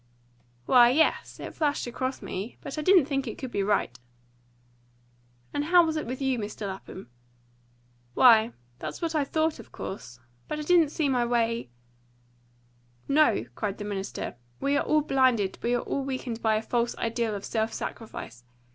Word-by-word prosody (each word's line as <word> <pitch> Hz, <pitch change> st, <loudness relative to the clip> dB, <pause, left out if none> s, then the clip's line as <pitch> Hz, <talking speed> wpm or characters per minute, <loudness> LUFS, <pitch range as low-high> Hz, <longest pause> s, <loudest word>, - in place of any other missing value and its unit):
"Why, 240 Hz, -, +7 dB
yes, 310 Hz, +6 st, +1 dB
it -, -, -7 dB
flashed 295 Hz, -2 st, 0 dB
across 255 Hz, +2 st, -3 dB
me. 195 Hz, +6 st, -5 dB
But 280 Hz, -, -5 dB
I -, -, -1 dB
didn't 365 Hz, -2 st, +5 dB
think 275 Hz, -2 st, -2 dB
it 225 Hz, -, -5 dB
could 260 Hz, -2 st, -6 dB
be 200 Hz, -, 0 dB
right." 195 Hz, -, 0 dB, 1.5 s
"And 290 Hz, -, -1 dB
how 350 Hz, +1 st, +6 dB
was 320 Hz, -1 st, -1 dB
it 310 Hz, -, -3 dB
with 255 Hz, +2 st, -4 dB
you, 265 Hz, -3 st, 0 dB
Mr. 210 Hz, 0 st, -5 dB
Lapham?" 190 Hz, -7 st, -8 dB, 1.0 s
"Why, 230 Hz, -2 st, +6 dB, 0.3 s
that's 155 Hz, -1 st, -5 dB
what 330 Hz, -1 st, -2 dB
I 305 Hz, -2 st, +2 dB
thought, 315 Hz, +1 st, 0 dB
of 230 Hz, -, -12 dB
course. 125 Hz, -9 st, -7 dB, 0.3 s
But -, -, -3 dB
I 300 Hz, -, -4 dB
didn't 335 Hz, -1 st, +4 dB
see 305 Hz, 0 st, 0 dB
my 250 Hz, -3 st, +2 dB
way 235 Hz, -, 0 dB, 0.7 s
" 120 Hz, 0 st, -36 dB
"No," 300 Hz, -, +4 dB
cried 200 Hz, -, -3 dB
the 205 Hz, -, -6 dB
minister, 200 Hz, -8 st, -4 dB, 0.2 s
"we 280 Hz, +1 st, +1 dB
are 285 Hz, -, +2 dB
all 305 Hz, 0 st, +3 dB
blinded, 255 Hz, -9 st, +2 dB
we 240 Hz, +1 st, +1 dB
are 240 Hz, -, 0 dB
all 275 Hz, -, -2 dB
weakened 255 Hz, -4 st, -4 dB
by 220 Hz, -1 st, +2 dB
a 215 Hz, -, -1 dB
false 235 Hz, +1 st, -1 dB
ideal 230 Hz, -1 st, -1 dB
of 200 Hz, -, -6 dB
self 220 Hz, 0 st, -1 dB
sacrifice. 125 Hz, -, -7 dB
235 Hz, 175 wpm, -27 LUFS, 205-280 Hz, 1.5 s, Why